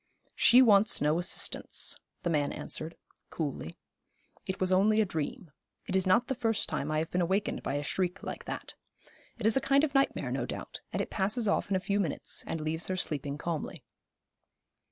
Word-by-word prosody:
'She 250 +2 +6
wants 210 -2 +5
no 150 +3 +2
assistance,' 175 - +1 0.3
the 175 - 0
man 145 -2 +1
answered, 160 +2 -4 0.3
coolly. 140 - -4 0.7
'It 190 - -3
was 185 0 +2
only 210 +3 +4
a 215 - +4
dream. 175 - -4 0.3
It 190 - -2
is 190 0 +2
not 230 +6 +4
the - - 0
first 225 -3 0
time 140 - -2
I 155 - 0
have 160 +1 -2
been 180 - +1
awakened 190 +4 0
by - - -2
a 145 - -1
shriek 180 +4 -1
like - - -6
that. - - -6 0.6
It 230 - -5
is 220 - +5
a 270 - +3
kind 275 +1 +3
of 295 -3 0
nightmare, 275 0 +1
no - - -2
doubt; - - -7
and - - -1
it - - -9
passes 215 +3 0
off 200 - +1
in 195 - +1
a - - +2
few 200 +2 -1
minutes, 170 -8 -2
and 165 - -3
leaves 160 +2 -1
her 185 - -2
sleeping 145 -4 -2
calmly.' 165 0 -4
185 Hz, 195 wpm, -30 LUFS, 160-215 Hz, 0.7 s, She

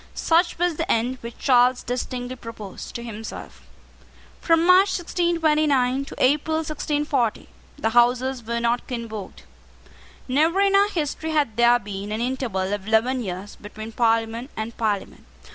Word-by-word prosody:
Such 335 +2 +2
was 350 -2 0
the - - -1
end 245 +3 0
which 235 0 -8
Charles 250 -1 +3
distinctly 250 +1 -4
proposed 225 -5 -9
to 235 - -5
himself. 225 -1 -9 0.7
From 330 0 +3
March 370 +3 +5
1629 310 -7 +1
to - - -10
April 295 +4 +2
1640, 295 -6 -1 0.3
the 225 - -1
Houses 245 +2 +2
were 235 +1 -2
not 235 +1 0
convoked. 230 -5 -6 0.8
Never 315 +8 +2
in 395 0 +3
our 400 +1 +5
history 320 -3 -3
had 285 -8 +1
there 240 +1 +5
been 205 -2 -7
an 215 - -2
interval 230 -6 -2
of 205 -1 -4
eleven 240 +4 +2
years 190 -1 -6
between 215 +2 -9
Parliament 230 +2 0
and 220 +1 -4
Parliament. 210 -3 -2
245 Hz, 145 wpm, -23 LUFS, 225-300 Hz, 0.8 s, March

